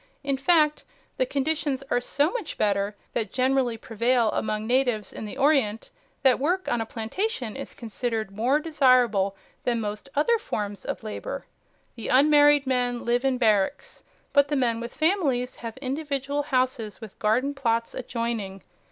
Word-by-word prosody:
In 275 -1 0
fact 300 +1 +3 0.3
the - - +1
conditions 290 - -1
are 245 - +2
so 285 +5 +1
much 460 -9 -5
better 200 0 0 0.2
than 220 - -1
generally 255 -2 +1
prevail 230 +1 +1
among 215 0 -2
natives 245 -4 +1
in - - -6
the 210 - -7
Orient 270 -7 +2 0.3
that 260 -3 +5
work 360 +7 0
on 240 - +1
a 225 - -4
plantation 245 - -3
is 275 - -7
considered 225 -2 -3
more 240 +8 +2
desirable 250 -11 +3 0.3
than 240 -2 +1
most 210 +4 -5
other 445 +11 +3
forms 205 - -4
of - - -4
labor. 220 - -5 0.5
The 230 - -6
unmarried 290 +1 +5
men 245 -2 0
live 240 +2 +1
in 265 -1 +1
barracks, 215 -1 +1 0.3
but 285 -1 +5
the 295 - -1
men 235 -4 +1
with 235 +1 -5
families 305 -8 0
have 230 +1 -7
individual 280 +1 -2
houses 255 -6 -1
with 220 -4 -11
garden 250 +7 +1
plots 230 -4 -1
adjoining. 230 -6 -4
250 Hz, 155 wpm, -26 LUFS, 225-285 Hz, 0.5 s, that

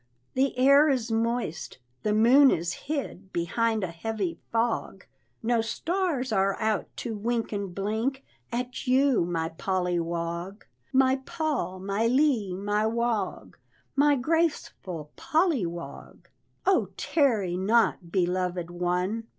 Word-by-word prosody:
"The 265 0 +1
air 280 +4 +6
is 245 -4 0
moist, 225 -7 -2 0.2
the 215 - 0
moon 245 +6 +6
is 170 -3 0
hid 275 - -5
Behind 220 +6 0
a 180 - -2
heavy 190 -1 -3
fog; 225 -4 -1 0.4
No 235 0 +2
stars 310 +1 -1
are 195 -1 +1
out 220 -1 0
to 230 -3 -4
wink 230 +2 -2
and 200 -4 -4
blink 220 +7 -2 0.3
At 250 +2 -4
you, 260 -6 +3
my 165 -2 -2
Polly 180 +1 -1
Wog 170 +3 -4 0.3
My 265 0 +4
Pol, 275 - -3
my 200 +4 0
Ly 245 -7 +2
my 205 +2 0
Wog, 235 -1 -2 0.4
My 290 +1 +4
graceful 255 - -1
Polly 315 - +1
Wog; 170 0 -9 0.4
Oh, 320 - +3
tarry 230 - +1
not, 195 -2 +1
beloved 180 -1 -1
one! 180 +6 -1
220 Hz, 125 wpm, -27 LUFS, 185-260 Hz, 0.4 s, air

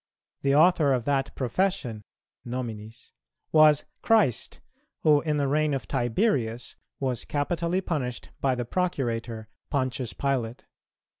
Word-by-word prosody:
The 140 0 +2
author 155 -3 +5
of 125 -2 -1
that 140 -1 0
profession 130 - -1 0.4
(nominis) 115 -2 -6 0.4
was 155 -2 +6 0.2
Christ, 215 - +2 0.4
who, 150 -2 +5
in 155 -2 0
the 140 -1 +1
reign 150 +1 +2
of 135 - -5
Tiberius, 120 - 0 0.2
was 130 -3 -1
capitally 170 +5 -1
punished 130 -9 -3
by 135 -2 +1
the 120 -1 -3
Procurator, 120 -9 -2 0.2
Pontius 130 -3 -1
Pilate. 125 -4 -2
135 Hz, 120 wpm, -27 LUFS, 120-155 Hz, 0.4 s, was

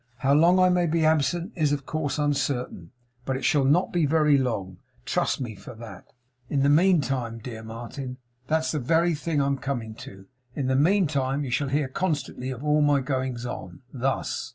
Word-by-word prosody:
How 135 +2 +2
long 170 +5 +5
I 185 0 +5
may 180 -1 +2
be 165 0 +1
absent 160 - +1
is, 155 -5 +1
of 140 -2 -2
course, 150 -2 -2
uncertain; 135 - -1 0.3
but 130 +1 -2
it - - -4
shall 150 -8 +3
not 155 +7 +2
be 170 -4 +2
very 150 -1 +4
long. 105 -9 -2 0.3
Trust - - 0
me 120 -4 -4
for 115 +4 -11
that.' 110 -5 -11 0.4
'In 140 - +1
the 140 - +4
meantime, 145 -8 +2
dear 115 0 -8
Martin 120 +3 -7
' 120 +1 -40
'That's 160 0 +1
the 155 - -1
very 165 +6 +2
thing 155 0 -1
I 140 - +2
am 140 -1 0
coming 120 -6 -4
to. 95 0 -11 0.3
In 140 - -2
the 130 0 +1
meantime 145 -4 +2
you 130 - -4
shall 140 +2 0
hear, 145 0 0
constantly, 140 -4 -3
of 130 +1 -6
all 150 0 +3
my 145 -1 +4
goings 130 -2 -3
on. 95 -7 -7
Thus. 135 +1 -2
140 Hz, 200 wpm, -25 LUFS, 125-155 Hz, 0.4 s, long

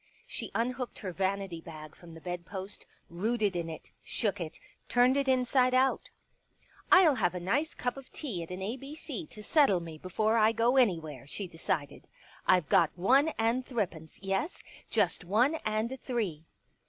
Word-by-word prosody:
She - - -5
unhooked 250 +2 -2
her 190 - -5
vanity 190 -2 -2
bag 155 -2 -10
from 170 -2 -13
the 165 - -11
bedpost, 185 +3 -6 0.2
rooted 205 +2 0
in 170 -1 -2
it, 160 - -9
shook 205 -4 -1
it, 160 -2 -5 0.3
turned 250 +2 +4
it 280 -1 +1
inside 255 0 +3
out. 265 +1 +2 0.4
" - - -30
ril 370 -6 +8
have 185 -8 0
a - - -2
nice 260 - 0
cup 245 +1 -2
of 270 -1 -11
tea 235 - -4
at 165 - -7
an 180 +1 -5
A 220 +6 -3
B 275 +3 -9
C 315 +1 -6
to 210 - -12
settle 240 - +4
me 165 -2 -8
before 215 +6 +1
I 220 +1 +5
go 230 +3 +2
anywhere," 165 - +1
she 200 +6 -5
decided. 165 -3 -3 0.2
" - - -24
I've 180 -5 +4
got 165 +2 +5
one 260 - +4
and 230 +3 +1
thrippence 185 - -4
— - - -31
yes, 195 - -2 0.3
just - - +1
one 225 - +3
and 220 +4 -1
three." 200 - -2
210 Hz, 180 wpm, -30 LUFS, 175-250 Hz, 0.4 s, ril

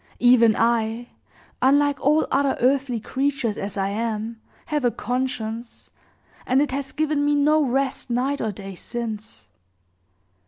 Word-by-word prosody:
Even 235 -3 +5
I 230 +1 0 0.5
unlike 285 +2 +3
all 300 +3 +3
other 280 -1 +2
earthly 255 -1 +1
creatures 265 -1 -1
as 205 0 -5
I 195 0 0
am 220 +1 -3 0.2
have 300 -3 -1
a 245 - +4
conscience, 235 -2 -4 0.6
and 260 +1 +3
it 290 -2 +1
has 275 0 -3
given 305 -1 0
me 290 0 +2
no 300 +2 +3
rest 270 0 -1
night 260 +4 0
or 220 - -1
day 195 0 -8
since. 220 +2 -6
250 Hz, 140 wpm, -23 LUFS, 225-280 Hz, 0.6 s, Even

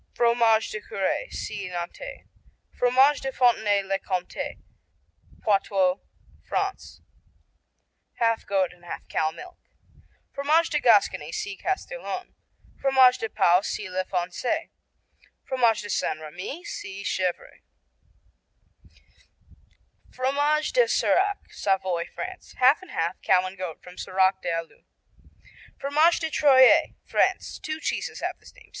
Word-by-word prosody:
Fromage 235 -2 +3
de 215 - -5
Curé 200 - -2
see 195 -3 -5
Nantais. 180 - -7 0.5
Fromage 260 +4 +4
de 270 - -3
Fontenay 220 -6 +2
le 195 0 -1
Comté 185 -2 -4 0.9
Poitou, 195 -2 +2 0.4
France 390 0 -3 1.1
Half 230 -1 0
goat 190 -3 +1
and 175 0 -23
half 175 - -8
cow 155 - 0
milk. 360 - -12 0.7
Fromage 305 +4 +2
de 300 - +2
Gascony 205 - +3
see 200 +3 -4
Castillon. 385 - -4 0.5
Fromage 260 -2 +5
de 225 - -3
Pau 180 -3 +4
see 205 - -4
La 185 +1 0
Foncée. 185 - -2 0.8
Fromage 235 -5 +2
de - - -6
St. - - -1
Rémy 180 - -8
see 195 +1 -7
Chevrets. 185 -3 -3 2.5
Fromage 290 +4 0
de - - +4
Serac 405 -2 +2 0.2
Savoy, 190 -3 0
France 370 0 -8
Half 260 +6 +5
and 370 - -14
half, 165 +2 -2
cow 185 0 +3
and 185 +1 -6
goat, 180 -4 -7
from 180 0 -12
Serac 190 +1 +1
des 180 - -3
Allues. 165 -1 -5 1.0
Fromage 305 +5 +3
de 320 -1 -3
Troyes 265 -4 +5
France - - 0
Two 310 0 -4
cheeses - - -3
have - - -3
this - - -16
name. - - -17
220 Hz, 125 wpm, -25 LUFS, 185-285 Hz, 2.5 s, Fromage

